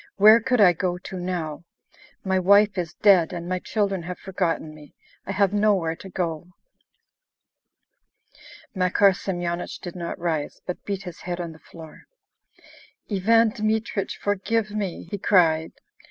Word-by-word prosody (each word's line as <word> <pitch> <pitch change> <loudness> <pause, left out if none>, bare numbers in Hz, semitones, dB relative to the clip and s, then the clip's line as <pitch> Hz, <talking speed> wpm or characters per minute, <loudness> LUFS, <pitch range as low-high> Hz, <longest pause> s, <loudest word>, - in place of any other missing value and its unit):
Where 215 +3 +7
could 250 +1 +1
I 185 -4 +7
go 180 +1 -2
to 185 0 -8
now?... 175 -3 -4 0.6
My 190 -1 +1
wife 200 +2 +5
is 175 -3 -4
dead, 190 -5 +4
and 175 -1 -6
my 185 0 -1
children 195 -2 -1
have 180 +2 -6
forgotten 170 -4 -2
me. 150 -2 -15 0.3
I - - -2
have 200 0 +1
nowhere 200 -6 +2
to 190 - -11
go..." 170 -3 -3 2.3
Makar 190 +1 +4
Semyonich 175 -2 -4
did 175 -1 -8
not 170 -1 -5
rise, 160 -4 -3
but 180 - -6
beat 200 -1 -3
his 180 -3 -9
head 175 0 -5
on 170 -2 -4
the 160 - -15
floor. 160 -2 -14 1.1
"Ivan 225 +4 +4
Dmitrich, 215 -3 -2
forgive 210 +2 -1
me!" 205 -4 -4
he 205 - -3
cried. 165 -5 +3
185 Hz, 145 wpm, -24 LUFS, 170-205 Hz, 2.3 s, Where